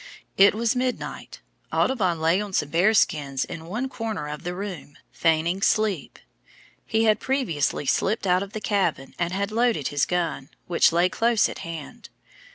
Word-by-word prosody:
It 200 +1 +6
was 230 +2 +1
midnight, 250 0 -4 0.3
Audubon 190 -10 +1
lay 165 +5 +2
on 205 -2 -6
some 150 - 0
bear 175 +7 +3
skins 140 -8 +1
in 165 0 -8
one 230 +9 -2
corner 225 - -4
of 150 0 -6
the 175 0 -4
room, 185 -7 -7
feigning 165 +3 +1
sleep. 215 -1 0 0.7
He 220 0 +1
had 215 -1 +3
previously 220 - -1
slipped 200 - 0
out 180 0 +3
of 200 +1 -6
the 215 - -5
cabin 195 -10 -1
and 170 0 0
had 200 +2 -2
loaded 230 - +1
his 145 -1 0
gun, 170 -6 -2 0.2
which 170 -1 +3
lay 175 +2 +3
close 230 +2 +2
at - - -8
hand. 165 -3 -8
185 Hz, 165 wpm, -24 LUFS, 165-215 Hz, 0.7 s, It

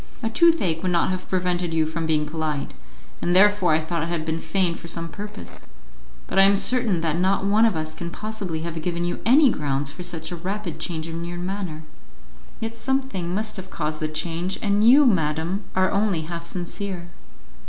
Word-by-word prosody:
A 225 - 0
toothache 230 - +3
would 185 - 0
not 170 +1 +2
have 185 0 -4
prevented 180 -2 0
you 160 -1 +3
from 160 +1 -3
being 155 -1 +2
polite, 150 -2 -3 0.5
and 175 - +1
therefore 190 -3 +5
I 155 - +4
thought 165 +1 -2
it 165 - -2
had 165 -2 -2
been 160 0 -1
feigned 170 +1 0
for - - -9
some 165 0 -4
purpose. 90 - -8 0.6
But 195 - 0
I - - +9
am 195 +1 +6
certain 220 -4 +2
that 165 0 0
not 190 +2 +2
one 215 +3 +5
of 215 - 0
us 155 0 -3
can 170 +1 -5
possibly 200 -5 -4
have 165 -1 -4
given 170 +1 -2
you 175 - -2
any 270 +2 +6
grounds 140 -3 -1
for 155 - -9
such 175 -1 -5
a - - -3
rapid 185 0 -4
change 160 -2 -3
in 165 +1 -5
your 175 +1 -5
manner." 180 -3 -4 0.8
"Yet 225 0 -4
something 255 -10 -1
must 215 +1 -2
have 190 0 -8
caused 155 -2 -3
the 155 - -1
change, 165 +4 -2
and 205 0 +2
you, 270 +6 +8
madam, 170 - +1
are 185 0 +3
only 200 -4 +1
half 170 +1 -6
sincere." 180 0 -5
175 Hz, 200 wpm, -24 LUFS, 160-200 Hz, 0.8 s, I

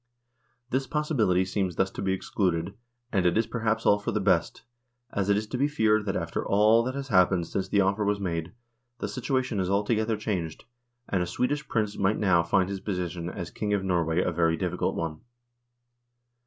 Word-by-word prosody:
This 135 +1 0
possibility 115 - +1
seems 95 -2 -2
thus 95 +2 +1
to - - -6
be 95 - 0
excluded, 95 -2 -1 0.4
and 95 -5 +2
it 90 +2 +2
is 115 - +3
perhaps 110 -1 -1
all 105 - +5
for 105 - -3
the - - 0
best, - - +1 0.5
as 100 -1 -1
it 100 - +4
is 110 - -1
to 125 +4 -5
be 140 - +3
feared 110 -7 +2
that 95 - -1
after - - -2
all 105 +3 +4
that 130 +3 -3
has 140 -1 -5
happened 90 -3 +4
since 95 +3 -3
the 100 +1 +3
offer 100 +2 +1
was 100 0 +1
made, 85 -3 -3 0.5
the 105 - -3
situation 125 +1 -1
has 95 -1 0
altogether 110 +2 +1
changed, 90 -7 -3 0.4
and 95 - 0
a 90 - -1
Swedish 145 - -1
Prince 105 -2 -1
might 100 +2 +2
now 95 -5 +3
find 90 +2 +2
his 100 0 -4
position 90 -3 -3
as 90 -2 -6
King 105 -1 -1
of 100 - -2
Norway 85 -2 +1
a - - 0
very 85 -1 +2
difficult 90 -1 -1
one. 80 -2 -4
100 Hz, 195 wpm, -27 LUFS, 90-110 Hz, 0.5 s, all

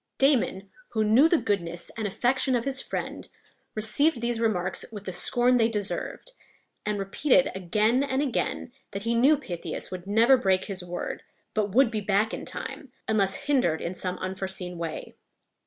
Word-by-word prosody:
Damon, 235 -8 +2 0.2
who 220 -2 +2
knew 235 +9 +5
the 340 - +4
goodness 175 - -2
and 220 -2 -2
affection 255 +5 +1
of 235 - -1
his 270 -1 0
friend, - - -5 0.5
received 240 +7 +2
these 235 0 -1
remarks 190 -5 0
with 205 -3 -8
the 190 - -4
scorn 245 +7 +2
they 225 -2 +4
deserved, 210 - -3 0.6
and 210 -1 0
repeated 265 +8 +2
again 210 +7 +1
and 270 -1 0
again 260 -2 -1 0.2
that 195 +1 -4
he 230 +1 0
knew 270 +6 +5
Pythias 180 - -5
would 185 0 -7
never 230 +6 +5
break 190 -6 +2
his 190 -2 -4
word, 175 0 -5 0.3
but 205 -2 -1
would 260 -2 +5
be 215 -2 -2
back 210 +2 +1
in - - -5
time, 275 - -7 0.2
unless 200 -3 +1
hindered 250 - +2
in 170 - -3
some 180 0 -3
unforeseen 185 -2 -4
way. 165 -2 -5
215 Hz, 170 wpm, -27 LUFS, 190-250 Hz, 0.6 s, knew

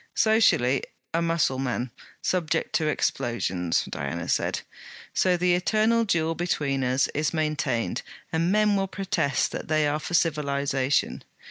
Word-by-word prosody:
'Socially 180 - +3 0.3
a 165 - +1
Mussulman, 135 -7 0 0.3
subject 165 -3 0
to 155 - +1
explosions!' 95 - 0
Diana 85 0 -4
said. - - 0 0.5
'So 180 -1 +2
the 180 0 +2
eternal 220 +5 +2
duel 165 -5 +1
between 145 -6 -1
us 130 +2 +2
is 155 +3 -1
maintained, 150 - -1 0.3
and 165 +2 +1
men 210 0 +3
will 195 -1 0
protest 185 - 0
that - - -5
they 155 -1 +2
are 145 +1 0
for 175 - -3
civilization. 140 -4 0
155 Hz, 130 wpm, -26 LUFS, 135-180 Hz, 0.5 s, Socially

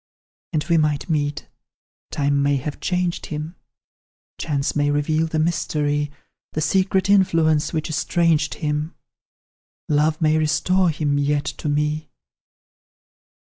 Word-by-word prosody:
"And 155 -3 0
we 170 0 +2
might 150 +1 0
meet 145 -2 -1 0.6
time 140 0 +1
may 140 0 +2
have 140 +2 -4
changed 180 -1 -1
him; 155 +3 -5 0.8
Chance 140 -2 -1
may 145 -1 +2
reveal 155 +2 +1
the 160 - -3
mystery, 150 -2 0 0.4
The 155 - -1
secret 190 +4 +1
influence 165 -6 +3
which 155 -2 -2
estranged 160 -1 +1
him; 150 +1 -2 0.9
Love 155 +1 +2
may 155 -1 +3
restore 155 +4 +2
him 150 -2 0
yet 145 0 0
to 150 - -4
me. 150 +1 -1
155 Hz, 120 wpm, -22 LUFS, 145-165 Hz, 0.9 s, influence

